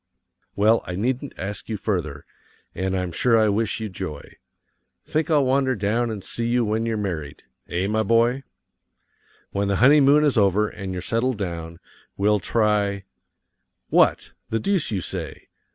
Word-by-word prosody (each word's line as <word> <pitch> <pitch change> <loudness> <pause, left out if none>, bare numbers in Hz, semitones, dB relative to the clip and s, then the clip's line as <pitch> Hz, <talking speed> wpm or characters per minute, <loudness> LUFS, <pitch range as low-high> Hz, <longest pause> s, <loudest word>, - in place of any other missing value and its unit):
Well, 110 +3 +3
I 90 - -4
needn't 130 +7 -2
ask 100 +3 -6
you 110 - -2
further, 85 -9 -3 0.5
and 95 +1 -2
I'm 90 -1 -2
sure 115 +7 +2
I 110 -1 +4
wish 110 +2 0
you 110 - -3
joy. 90 -7 -7 0.7
Think 155 +1 -1
I'll 150 -4 +3
wander 130 0 +2
down 110 +4 0
and 105 -4 -5
see 115 0 -3
you 120 0 +2
when 110 +2 -1
you're 115 -1 -1
married 80 -8 -4 0.3
eh, 90 +2 -1
my 110 +2 +1
boy? 115 +4 +2 1.1
When 100 0 -1
the 100 - +1
honeymoon 140 +4 +5
is 140 -6 +3
over 100 +1 +3
and 95 -2 -7
you're 90 -1 -5
settled 115 +3 0
down, 85 -3 -5 0.4
we'll 105 +1 +2
try 105 -1 +1 0.9
What? - - +3 0.2
the 115 - 0
deuce 195 - 0
you 100 -4 -2
say! - - -6
105 Hz, 160 wpm, -23 LUFS, 95-120 Hz, 1.1 s, honeymoon